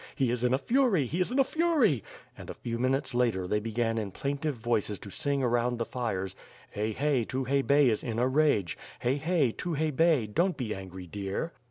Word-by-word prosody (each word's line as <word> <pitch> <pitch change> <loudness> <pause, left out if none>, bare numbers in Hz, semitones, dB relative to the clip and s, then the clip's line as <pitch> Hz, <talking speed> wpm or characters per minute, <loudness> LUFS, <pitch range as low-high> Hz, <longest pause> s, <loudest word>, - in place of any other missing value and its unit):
He 130 -3 +1
is 120 0 -2
in 125 - +3
a 130 - +4
fury! 230 - +2
He 160 +9 -3
is 180 - +1
in 250 - -2
a 270 - +6
fury! 275 - +2 0.3
And - - -11
a - - -6
few 115 -1 -4
moments 135 +1 0
later 115 -7 +1
they 105 +3 +1
began 115 +1 -1
in 105 -2 -3
plaintive 140 - -2
voices 110 -3 -1
to 100 +3 -10
sing 140 +5 -1
around 120 0 +1
the 115 - -1
fires: 95 -7 -3 0.2
" - - -24
Hey 105 +2 -2
hey, 135 +1 +1
Tukhay 135 +3 0
Bey 140 0 +4
Is 110 -3 +1
in 115 -2 -3
a 125 +2 +2
rage, 130 - +2 0.2
Hey. 125 +3 +1
hey; 155 -4 +1
Tukhay 155 0 -2
Bey 160 -6 +4
Don't 170 - 0
be 115 -5 -2
angry, 95 -1 -8
dear." 100 - -4
125 Hz, 215 wpm, -29 LUFS, 110-150 Hz, 0.3 s, a